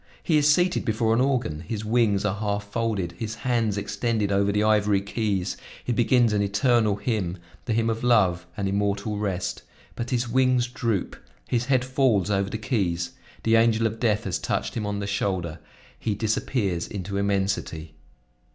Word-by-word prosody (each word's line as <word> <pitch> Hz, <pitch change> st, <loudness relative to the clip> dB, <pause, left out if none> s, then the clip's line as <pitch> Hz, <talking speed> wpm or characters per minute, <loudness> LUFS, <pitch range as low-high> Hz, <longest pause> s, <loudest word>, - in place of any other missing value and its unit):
He 160 Hz, -, +2 dB
is 150 Hz, 0 st, +5 dB
seated 180 Hz, +3 st, +2 dB
before 110 Hz, -1 st, +1 dB
an 115 Hz, -, +3 dB
organ; 125 Hz, -, 0 dB
his 105 Hz, +6 st, -5 dB
wings 105 Hz, -3 st, +2 dB
are 100 Hz, 0 st, -1 dB
half 105 Hz, -1 st, -1 dB
folded, 105 Hz, -6 st, -1 dB
his 110 Hz, 0 st, -4 dB
hands 115 Hz, -5 st, +1 dB
extended 105 Hz, +1 st, -1 dB
over 100 Hz, +1 st, +2 dB
the 105 Hz, +1 st, +1 dB
ivory 105 Hz, -2 st, +3 dB
keys; 100 Hz, -2 st, -2 dB, 0.3 s
he 125 Hz, -, -1 dB
begins 120 Hz, -1 st, +3 dB
an 105 Hz, -, +2 dB
eternal 105 Hz, +1 st, +2 dB
hymn; 100 Hz, -4 st, -2 dB, 0.3 s
the 115 Hz, -, 0 dB
hymn 115 Hz, +1 st, +1 dB
of 115 Hz, 0 st, -2 dB
love 95 Hz, -8 st, +3 dB
and 100 Hz, -2 st, -1 dB
immortal 100 Hz, +1 st, -1 dB
rest, 95 Hz, -3 st, -2 dB, 0.3 s
but 120 Hz, 0 st, -4 dB
his 125 Hz, -1 st, 0 dB
wings 130 Hz, 0 st, +3 dB
droop, 115 Hz, -5 st, -2 dB, 0.3 s
his 120 Hz, -1 st, 0 dB
head 130 Hz, -1 st, +2 dB
falls 130 Hz, -7 st, +2 dB
over 100 Hz, 0 st, +1 dB
the 110 Hz, -, -3 dB
keys; 90 Hz, -8 st, -1 dB, 0.3 s
the 115 Hz, 0 st, +4 dB
angel 115 Hz, 0 st, +4 dB
of 110 Hz, 0 st, -2 dB
death 110 Hz, -2 st, +1 dB
has 95 Hz, -4 st, -2 dB
touched -, -, -2 dB
him 105 Hz, -2 st, -3 dB
on 105 Hz, 0 st, -2 dB
the 100 Hz, -, -3 dB
shoulder, 95 Hz, -5 st, -2 dB, 0.4 s
he 110 Hz, -3 st, -1 dB
disappears 105 Hz, -4 st, -1 dB
into 100 Hz, 0 st, -4 dB
immensity! 95 Hz, -6 st, -1 dB
105 Hz, 175 wpm, -25 LUFS, 100-115 Hz, 0.4 s, is